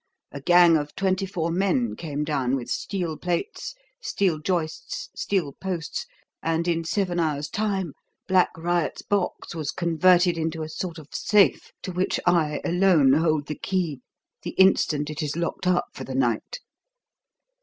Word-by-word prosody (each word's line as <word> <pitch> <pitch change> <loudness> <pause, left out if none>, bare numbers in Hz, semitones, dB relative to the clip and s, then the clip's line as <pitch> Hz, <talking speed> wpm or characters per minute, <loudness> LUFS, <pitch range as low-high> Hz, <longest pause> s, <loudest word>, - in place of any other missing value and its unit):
A 140 - -7
gang 175 +2 +6
of 145 -1 -5
twenty 190 0 0
four 170 -3 -2
men 200 +7 +1
came 150 -3 -4
down, 135 -4 0
with 125 -3 -5
steel 175 -6 -2
plates, 180 - -3 0.3
steel 190 - 0
joists, 180 - -3
steel 180 -8 -1
posts, 180 -2 -4 0.3
and 165 +1 0
in 165 -1 +1
seven 180 0 -1
hours' 150 -3 -1
time 195 -7 -1 0.3
Black 185 -1 +4
Riot's 170 -2 -1
box 200 -4 -2
was 155 -3 -4
converted 175 0 +3
into 160 0 -2
a 155 - -6
sort 170 +1 -5
of 155 -2 -12
safe, 205 -2 +3
to 185 - -4
which 180 +1 0
I 165 -4 +2
alone 175 -6 +4
hold 155 -1 +2
the 150 - -4
key 165 -5 -2 0.4
the - - -6
instant 155 -6 +3
it 150 - -4
is 150 -1 -2
locked 170 +2 -2
up 180 -1 +3
for - - -7
the 130 - -6
night. 120 - -1
170 Hz, 155 wpm, -25 LUFS, 155-185 Hz, 0.4 s, gang